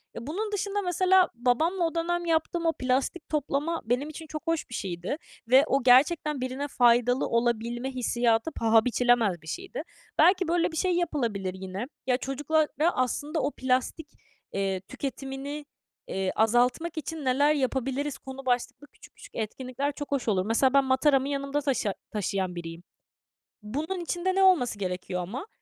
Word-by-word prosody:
E, 235 - -7
bunun 415 +8 -3
dışında, 410 0 -1
mesela, 370 0 +3
babamla 285 +10 +1
o 330 - -2
dönem 345 +1 -1
yaptığım 335 +1 0
o 325 - +3
plastik 260 +6 -1
toplama 300 +2 -1
benim 250 +6 0
için 315 +1 -9
çok 310 +2 -7
hoş 330 -1 -1
bir - - -9
şeydi 180 - -3 0.3
ve 260 +3 +7
o 275 -1 +1
gerçekten 285 +3 +4
birine 260 +3 -3
faydalı 245 -1 +3
olabilme 235 +2 0
hissiyatı 240 +1 +1
paha 225 -3 +3
biçilemez 240 -7 +2
bir 160 - -16
şeydi. 385 - -5 0.4
Belki 370 -1 +5
böyle 340 +1 +1
bir 320 - -6
şey 365 +2 +1
yapılabilir 235 - -1
yine. 190 +3 -5 0.2
Ya, 250 -1 +3
çocuklara, 295 +4 0 0.3
aslında, 290 +5 -1
o 280 - 0
"Plastik, 260 +5 -1 0.5
eee, 195 -1 -1
tüketimini, 275 +6 -6 0.4
iii, 190 -1 -1
azaltmak 245 +9 +2
için 315 -1 -5
neler 285 +4 +4
yapabiliriz?" 270 0 -1
konu 265 0 -9
başlıklı 250 +3 -1
küçük - - -17
küçük - - -14
etkinlikler 255 +5 -3
çok 290 0 -7
hoş 275 -4 -1
olur. 190 -4 +2
Mesela, 240 +4 +2
ben 275 0 +5
mataramı 265 +1 +3
yanımda 280 +1 -1
taşı 260 -8 0 0.2
taşıyan 195 -3 -2
biriyim. 165 0 -7 0.8
Bunun 295 - -3
içinde 350 +2 -1
ne 385 - +4
olması 275 - +4
gerekiyor 180 -1 -3
ama? 235 - -6
265 Hz, 155 wpm, -27 LUFS, 235-315 Hz, 0.8 s, ve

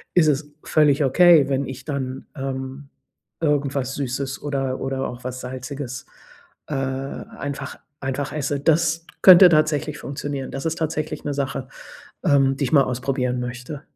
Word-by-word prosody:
ist 170 -3 +5
es 145 0 0
völlig 150 -1 +3
okay, 165 +1 +6
wenn 135 +1 0
ich 130 0 -8
dann, 135 -3 -4
ähm, 135 0 -5 0.5
irgendwas 140 -3 0
Süßes 135 0 -3
oder 135 -3 -2
oder 135 0 -2
auch 120 0 -9
was 125 0 -5
Salziges, 130 0 -6 0.6
äh, 150 - -3
einfach 135 +1 -4 0.2
einfach 135 +1 -3
esse. 145 -1 -1
Das 165 +2 +2 0.2
könnte 185 -1 +10
tatsächlich 155 -2 +1
funktionieren. 140 -1 -5
Das 135 +3 -5
ist 160 0 -1
tatsächlich 155 -1 -3
'ne 145 - -1
Sache, 135 -2 -3 0.6
ähm, 135 -5 +4
die 140 - 0
ich 125 - -3
mal 140 -3 +6
ausprobieren 125 0 -1
möchte. 125 +4 -6
140 Hz, 145 wpm, -22 LUFS, 130-150 Hz, 0.6 s, könnte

